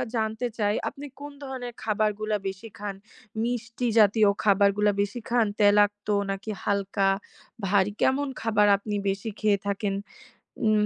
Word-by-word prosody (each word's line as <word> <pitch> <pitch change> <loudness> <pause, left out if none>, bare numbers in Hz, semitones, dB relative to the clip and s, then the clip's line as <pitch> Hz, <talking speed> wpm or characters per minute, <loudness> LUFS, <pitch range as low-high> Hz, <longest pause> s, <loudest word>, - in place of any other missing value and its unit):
জানতে 220 +2 -1
চাই, 205 -1 +1
আপনি 285 +1 -10 0.2
কোন 290 0 -7
ধরনের 255 -3 -6
খাবারগুলা 215 0 0
বেশি 200 +4 -9
খান? 200 -1 -5 0.5
মিষ্টি 240 0 -2
জাতীয় 210 0 +5
খাবারগুলা 205 0 +4
বেশি 205 +4 -3
খান? 235 -2 +3
তেলাক্ত 205 0 +4 0.2
নাকি 195 +2 -4
হালকা? 200 -1 +1 0.6
ভারী? 200 +1 +3
কেমন 280 +2 +2
খাবার 210 -2 +3
আপনি 205 +1 -4
বেশি 200 +3 -2
খেয়ে 205 -2 +2
থাকেন? 200 0 -1 0.7
উম 215 -1 +4
210 Hz, 135 wpm, -26 LUFS, 200-225 Hz, 0.7 s, জাতীয়